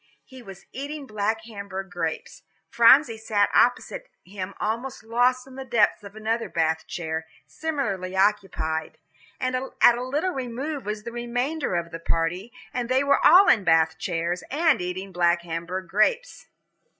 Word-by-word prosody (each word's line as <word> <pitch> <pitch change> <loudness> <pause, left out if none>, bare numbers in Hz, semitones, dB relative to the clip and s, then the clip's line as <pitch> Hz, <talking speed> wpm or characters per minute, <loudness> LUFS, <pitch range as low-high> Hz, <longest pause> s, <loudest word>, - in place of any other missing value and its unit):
He 260 -2 -13
was 195 -4 -12
eating 285 +2 -6
black 215 -1 -2
Hamburg 200 -4 -7
grapes. 165 -2 -4 0.3
Phronsie 235 0 +5
sat 210 -2 +1
opposite - - +1
him 190 0 -7
almost 230 +4 -3
lost 245 +3 +1
in 265 -1 -13
the 265 - -5
depth 235 -5 +2
of 200 +1 -11
another 225 +2 -2
Bath 160 -1 -1
chair, 160 -1 -4 0.2
similarly 205 - -3
occupied. 190 -6 0 0.4
And 255 0 -1 0.2
at 240 - +6
a - - -4
little 290 +8 -1
remove 265 - -5
was 210 0 -4
the 235 - -6
remainder 245 - -2
of 170 -1 -2
the 165 - -6
party, 170 +6 -2 0.2
and 245 -1 -3
they 260 +2 +3
all 345 +7 +6
were - - +6
in 210 - +2
Bath 160 -1 +3
chairs, 175 0 -2
and 305 - +2
eating 185 +2 -5
black 175 -1 +2
Hamburg 170 +2 -5
grapes. 465 - 0
215 Hz, 155 wpm, -25 LUFS, 180-255 Hz, 0.4 s, at